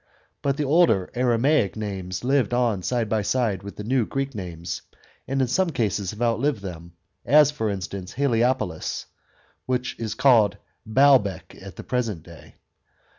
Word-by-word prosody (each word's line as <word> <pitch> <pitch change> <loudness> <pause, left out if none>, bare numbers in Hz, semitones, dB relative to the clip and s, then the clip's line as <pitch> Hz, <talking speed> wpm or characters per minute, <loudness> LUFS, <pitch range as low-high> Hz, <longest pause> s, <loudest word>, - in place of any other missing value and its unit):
But 140 -1 0
the 150 - 0
older 145 - +3
Aramaic 125 -2 +2
names 95 -3 -5
lived 130 -1 +1
on 115 -6 +1
side 115 +5 -1
by 110 0 0
side 105 -3 0
with 100 0 -9
the 105 - -7
new 125 +3 +1
Greek 135 0 -3
names, 85 -5 -6 0.5
and 135 0 +1
in - - 0
some 185 +8 +1
cases 105 - -1
have 105 +5 -4
outlived 120 +1 +1
them, 85 -2 -8 0.3
as, 150 +2 +5
for 130 -8 -2
instance, 95 -1 -5
Heliopolis, 120 - 0 0.6
which 125 -1 -1
is 115 -2 -3
called 110 -7 +4 0.3
Baalbec 120 -6 +3
at - - -10
the - - -8
present 115 -10 -2
day. 85 -2 -15
115 Hz, 155 wpm, -24 LUFS, 100-130 Hz, 0.6 s, as